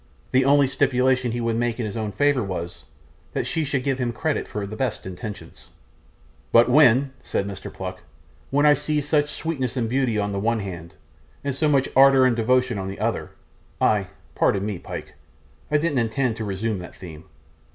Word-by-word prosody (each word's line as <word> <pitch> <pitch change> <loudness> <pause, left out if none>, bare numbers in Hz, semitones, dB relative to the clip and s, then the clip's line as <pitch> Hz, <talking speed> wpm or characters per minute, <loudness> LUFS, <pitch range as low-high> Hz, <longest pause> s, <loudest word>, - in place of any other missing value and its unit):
The 130 0 +3
only 140 0 +5
stipulation 130 -2 +1
he 120 +1 -2
would 115 -1 0
make 120 0 -1
in 120 - -1
his 105 - -5
own 110 -2 -3
favour 145 +3 +2
was, 90 -4 -5 0.5
that - - -1
she 160 +6 -1
should 140 -3 -1
give 135 -1 -1
him 120 -1 0
credit 150 +7 -2
for 105 -1 -4
the 105 +2 -7
best 120 -1 -2
intentions. 100 +3 -8 0.8
'But 115 +1 +6
when,' 135 -1 +5
said 100 - -2
Mr. 100 -2 -7
Pluck, 95 -1 -7 0.5
'when 145 +2 +2
I 150 - +7
see 150 +1 0
so 145 +1 +2
much 145 - -8
sweetness 140 -7 -3
and 115 -2 0
beauty 125 -2 0
on 100 -1 -1
the 100 - -2
one 115 +2 0
hand, 85 -4 -8 0.5
and 140 -1 -1
so 150 +3 +1
much 135 -2 +3
ardour 135 0 +7
and 125 -2 +3
devotion 125 -1 +1
on 95 - -4
the 95 - -6
other, - - -1 0.5
I 100 -3 +2 0.3
pardon 100 0 +1
me, 105 -4 -3
Pyke, - - -8 0.6
I 150 - +3
didn't 150 -3 0
intend 120 +1 0
to 110 - -4
resume 100 +1 -2
that 90 - -10
theme. 80 -3 -11
120 Hz, 195 wpm, -23 LUFS, 105-135 Hz, 0.8 s, I